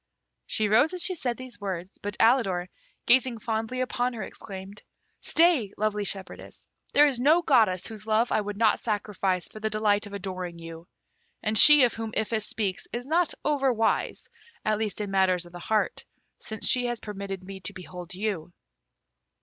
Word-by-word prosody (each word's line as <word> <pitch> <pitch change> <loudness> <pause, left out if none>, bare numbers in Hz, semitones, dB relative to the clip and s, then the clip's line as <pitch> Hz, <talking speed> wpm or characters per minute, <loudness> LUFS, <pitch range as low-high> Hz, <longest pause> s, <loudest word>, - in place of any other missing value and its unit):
She 215 - +1
rose 245 - +4
as 360 - -1
she 375 - +3
said 250 -8 -2
these 255 -4 -10
words, 190 -2 -5
but 205 0 -4
Alidor, 195 -7 +3 0.4
gazing 250 -1 +4
fondly 225 +3 -3
upon 250 0 -1
her, 220 -4 -5
exclaimed, 195 +1 -9 0.4
"Stay, 320 - +3
lovely 210 -1 -1
shepherdess; 195 -1 -3 0.3
there 295 - +6
is 270 -5 0
no 310 +7 +4
goddess 220 - +3
whose 215 -1 -8
love 220 +2 +2
I 215 - +2
would 205 0 -6
not 220 -1 +3
sacrifice 200 -4 -2
for 215 - -11
the 220 0 -1
delight 210 -1 +1
of 200 - -12
adoring 185 -3 -5
you; 165 0 -10 0.6
and 215 0 0
she 295 +4 +9
of 245 - +3
whom 225 -1 -5
Iphis 220 -1 -1
speaks 200 -4 -3
is 240 +1 -4
not 330 +3 +1
over 280 -3 +2
wise, 225 -2 -1 0.4
at 215 0 +1
least 215 -1 -2
in 205 -2 -4
matters 185 -2 +2
of 175 - -14
the 175 - -8
heart, 215 +4 -1 0.4
since 220 -1 -3
she 245 -1 +4
has 240 -1 -3
permitted 200 -2 -6
me 195 +1 -9
to 190 - -5
behold 180 -1 -9
you!" 185 -4 -3
215 Hz, 180 wpm, -26 LUFS, 195-240 Hz, 0.6 s, she